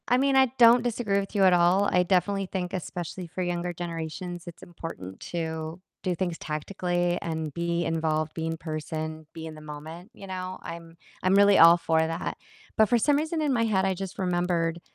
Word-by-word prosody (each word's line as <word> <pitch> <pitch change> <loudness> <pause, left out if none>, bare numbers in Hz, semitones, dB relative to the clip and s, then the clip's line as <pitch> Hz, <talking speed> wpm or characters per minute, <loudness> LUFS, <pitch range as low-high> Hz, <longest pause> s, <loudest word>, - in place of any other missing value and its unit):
I 250 - +4
mean, 275 +1 +2
I 265 0 +6
don't 235 0 +7
disagree 225 -4 0
with 200 +2 -6
you 200 - +4
at 185 -1 +6
all, 180 +3 +4
I 180 - +4
definitely 195 +2 +1
think 180 -1 -4
especially 180 0 -5
for 180 +3 -5
younger 175 0 -2
generations, 170 +1 -5
it's 170 - -10
important 160 - -8
to 160 0 -4 0.2
do 180 -1 0
things 175 -1 -2
tactically, 175 +2 -1
and 160 -3 -3
be 170 +1 -1
involved, 160 -1 0
be 160 0 -3
in 165 0 -3
person, 155 0 -5
be 160 -1 -7
in 160 - -7
the 155 - -11
moment, 155 +5 -9
you 200 - -11
know, 185 -1 -5
I'm 165 0 -9 0.3
I'm 185 +1 +4
really 200 0 +6
all 170 +1 +9
for 160 -1 +1
that, 160 +1 -2 0.4
but 220 -2 +5
for 240 - +4
some 285 +6 +3
reason 315 +2 -1
in 295 -3 +1
my 230 -2 +2
head, 190 -4 +2
I 190 - +2
just 190 0 -6
remembered, 175 -2 0
175 Hz, 200 wpm, -27 LUFS, 165-195 Hz, 0.4 s, all